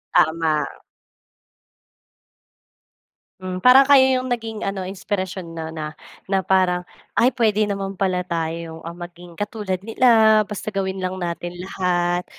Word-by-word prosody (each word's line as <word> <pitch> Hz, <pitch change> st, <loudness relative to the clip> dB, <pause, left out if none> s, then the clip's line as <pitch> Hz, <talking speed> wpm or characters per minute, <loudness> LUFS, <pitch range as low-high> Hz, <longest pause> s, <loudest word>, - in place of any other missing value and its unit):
Tama. 160 Hz, -2 st, +2 dB, 2.7 s
Hmm, 185 Hz, 0 st, -5 dB
parang 265 Hz, +2 st, +8 dB
kayo 275 Hz, -2 st, +7 dB
'yong 255 Hz, -, -5 dB
naging 225 Hz, -3 st, -3 dB
ano 195 Hz, -1 st, -3 dB
inspirasyon 190 Hz, -2 st, -4 dB
'no, 160 Hz, 0 st, -5 dB
na, 155 Hz, -1 st, -6 dB, 0.3 s
na 190 Hz, -1 st, +1 dB
parang, 180 Hz, -2 st, +2 dB, 0.3 s
"Ay 250 Hz, +3 st, +5 dB
puwede 215 Hz, -4 st, +2 dB
naman 195 Hz, -1 st, -3 dB
pala 185 Hz, -2 st, 0 dB
tayong, 165 Hz, -1 st, -4 dB
ah, 170 Hz, -, -6 dB
maging 175 Hz, 0 st, -10 dB
katulad 205 Hz, -3 st, -3 dB
nila 220 Hz, -1 st, +5 dB
basta 210 Hz, 0 st, -7 dB
gawin 190 Hz, -1 st, -2 dB
lang 185 Hz, 0 st, -2 dB
natin 175 Hz, 0 st, -4 dB
lahat 180 Hz, -1 st, -1 dB
185 Hz, 125 wpm, -22 LUFS, 175-210 Hz, 2.7 s, parang